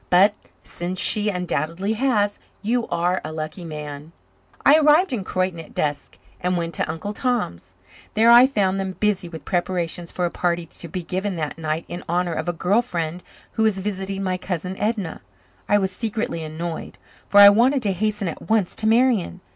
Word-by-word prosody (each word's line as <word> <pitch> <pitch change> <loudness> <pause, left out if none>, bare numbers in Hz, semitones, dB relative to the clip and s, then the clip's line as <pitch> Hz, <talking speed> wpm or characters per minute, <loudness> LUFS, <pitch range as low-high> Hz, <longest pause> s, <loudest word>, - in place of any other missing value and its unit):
But, 195 +3 +6 0.3
since 180 +2 -5
she 210 0 +3
undoubtedly 180 +1 -1
has, 215 -4 +1 0.2
you 235 +2 0
are 175 +2 0
a - - -5
lucky 155 +2 -5
man." 150 -1 -7 0.5
I 300 +3 +7
arrived 305 +2 +4
in 215 -6 -2
Croyden 185 -2 -1
at 160 - -11
dusk 145 -1 -2 0.2
and 180 0 0
went 170 -1 -3
to - - -2
Uncle 165 +6 -5
Tom's. 150 - -2 0.4
There 225 +2 +6
I 240 +2 +9
found 195 -7 0
them 190 -1 -3
busy 205 -4 +1
with 160 -4 -9
preparations 175 -1 -2
for 180 - -1
a 170 - -2
party 175 -1 -1
to 170 - -11
be 180 +2 -5
given 190 +3 -2
that 155 -1 -4
night 160 +1 -2
in 175 - -7
honour 175 0 0
of 175 - -2
a - - +2
girl 185 +6 +2
friend 175 -6 -4 0.3
who - - -2
was 220 -3 +3
visiting 195 0 -3
my 185 -1 -1
cousin 180 0 -4
Edna. 210 -5 -2 0.5
I 205 - +5
was 190 -1 0
secretly 215 -4 -3
annoyed, 160 +1 -6 0.3
for 205 - +5
I 200 0 +12
wanted 245 +6 +3
to 200 - +2
hasten 210 +1 -1
at 165 - -7
once 220 -5 +1
to 220 - +1
Marian. 225 -6 +2
185 Hz, 185 wpm, -22 LUFS, 170-210 Hz, 0.5 s, I